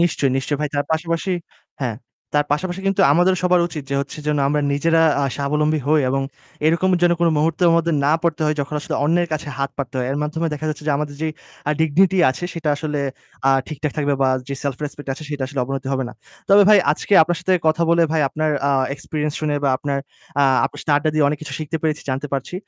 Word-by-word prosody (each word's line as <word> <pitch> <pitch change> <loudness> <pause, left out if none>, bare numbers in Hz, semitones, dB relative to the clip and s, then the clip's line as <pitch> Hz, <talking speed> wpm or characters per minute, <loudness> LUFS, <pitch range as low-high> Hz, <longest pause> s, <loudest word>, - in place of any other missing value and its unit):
নিশ্চয়ই, 150 -6 +2
নিশ্চয়ই 140 +2 -1
ভাই। 150 - 0
তার 145 0 0
পাশাপাশি 165 +3 -1 0.5
হ্যাঁ, 120 -5 -2 0.4
তার 145 0 +3
পাশাপাশি 180 +5 -2
কিন্তু 195 - +1
আমাদেরও 180 +2 +3
সবার 180 -1 +4
উচিত 150 -3 -6
যে - - 0
হচ্ছে 140 +2 -6
যেন 150 -1 +1
আমরা 150 0 +1
নিজেরা 165 +3 +3 0.2
আ - - +2
স্বাবলম্বী 150 +2 0
হই 155 +1 +4
এবং 135 +1 0 0.4
এরকম 170 +4 +2
যে 175 - +5
কোন 170 - +4
মুহূর্তর 165 +3 +2
মধ্যে 170 0 +1
না 150 - +4
পড়তে 165 -2 0
হয় 150 0 0
যখন 145 +2 -4
আসলে - - -4
অন্যের 170 +2 +2
কাছে 155 -1 -3
হাত 140 0 -1
পাততে 135 -2 -4
হয়। 125 - -1
এর 140 - -1
মাধ্যমে 160 +2 -2
দেখা 155 +2 -5
যাচ্ছে 150 0 -5
যে - - +3
আমাদের 145 -1 -4
যেই 155 -1 -1 0.4
আ - - +3
dignity 180 +5 +3
আছে 175 - -5
সেটা 165 -2 -3
আসলে 150 -1 -3 0.5
আ - - +6 0.2
ঠিকঠাক 150 -1 -3
থাকবে 145 -1 +1
বা 130 - +4 0.2
যে 140 - -2
self 135 -2 -1
respect 145 -1 -8
আছে 155 - -11
সেটা 145 -2 -3
আসলে 135 -1 -3
অবনতি 135 0 -4
হবে 130 -1 0
না। - - -9 0.4
তবে 200 +1 +7
ভাই 210 - +8
আজকে 200 - -5
আপনার 175 +1 0
সাথে 185 +1 0
কথা 155 +2 +3
বলে 170 0 +4
ভাই 160 - +2
আপনার 155 +2 -1 0.2
আ - - +2 0.2
এক্সপেরিয়েন্স 150 0 -3
শুনে 150 -1 0
বা - - +3
আপনার 140 -1 -2 0.4
আ - - +4 0.2
আপনার 145 - -4
সাথে 150 - 0
আড্ডা 155 +1 +1
দিয়ে 155 -2 +3
অনেক 150 0 -2
কিছু 140 -2 -7
শিখতে 155 +1 -3
পেরেছি, 155 -1 -1
জানতে 135 +3 -2
পারছি। 135 +6 -3
150 Hz, 230 wpm, -20 LUFS, 145-165 Hz, 0.5 s, ভাই